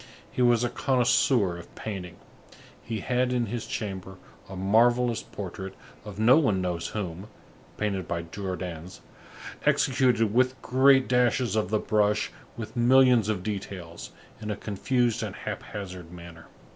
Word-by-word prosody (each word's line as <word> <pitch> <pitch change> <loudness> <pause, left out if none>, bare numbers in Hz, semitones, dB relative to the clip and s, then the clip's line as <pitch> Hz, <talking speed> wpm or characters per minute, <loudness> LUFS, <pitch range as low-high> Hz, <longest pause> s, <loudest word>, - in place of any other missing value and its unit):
He - - -2
was 120 -1 +4
a 120 - +1
connoisseur 120 -7 +2
of 85 - -14
painting. 90 -5 -6 0.7
He 110 -3 -4
had 125 +2 0
in 120 -1 +1
his 120 -1 -5
chamber 95 -3 -5 0.3
a 95 - -7
marvellous 115 +5 +3
portrait 95 -3 -7 0.3
of 105 -2 -9
no 115 +5 +6
one 105 -11 +2
knows 90 -2 -2
whom, 95 -2 -5 0.5
painted 100 -4 -2
by 85 0 -2
Jordaens, 90 -1 -6 0.6
executed 120 -5 +2
with 130 +2 +2
great 130 +2 +5
dashes 125 -3 +2
of 105 -4 0
the 110 - +2
brush, 105 0 +1 0.3
with 115 +2 -7
millions 125 -2 +5
of 100 -4 -1
details, 95 -5 -6 0.3
in 105 - -5
a 105 - -1
confused 115 +4 0
and - - -4
hap - - -5
hazard 90 -4 -8
manner. 85 -2 -11
105 Hz, 145 wpm, -27 LUFS, 95-120 Hz, 0.7 s, no